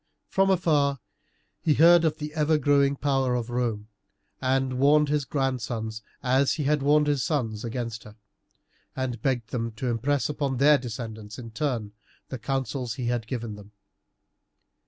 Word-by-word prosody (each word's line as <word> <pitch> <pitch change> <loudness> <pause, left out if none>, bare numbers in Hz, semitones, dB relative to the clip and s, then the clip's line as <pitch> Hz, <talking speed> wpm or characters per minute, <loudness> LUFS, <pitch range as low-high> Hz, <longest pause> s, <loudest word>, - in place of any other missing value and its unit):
From 195 0 +2
afar 150 -7 +2 0.6
he 150 - +2
heard 170 +2 +7
of 155 -1 +1
the 150 -1 -6
ever 155 0 +2
growing 140 -1 +3
power 135 -3 +1
of 120 0 -3
Rome, 115 -4 -2 0.5
and 130 -1 0
warned 150 +2 +4
his 145 -2 0
grandsons, 120 -5 -2 0.2
as 130 +2 +3
he 150 - -2
had 150 +1 +1
warned 150 +2 +4
his 145 -3 +1
sons, 115 -8 -2
against 115 -1 -4
her, 105 0 -12 0.8
and 125 -4 -3
begged 120 -3 -1
them 115 -2 -2
to 125 +3 -3
impress 135 +5 0
upon 140 -3 -2
their 145 +2 +5
descendants 110 -3 -7
in 115 -3 -8
turn 115 -4 -2 0.4
the 130 - -5
counsels 130 -1 -2
he 120 -2 -2
had 120 -3 -2
given 115 -3 -4
them. 105 0 -13
130 Hz, 155 wpm, -26 LUFS, 115-145 Hz, 0.8 s, heard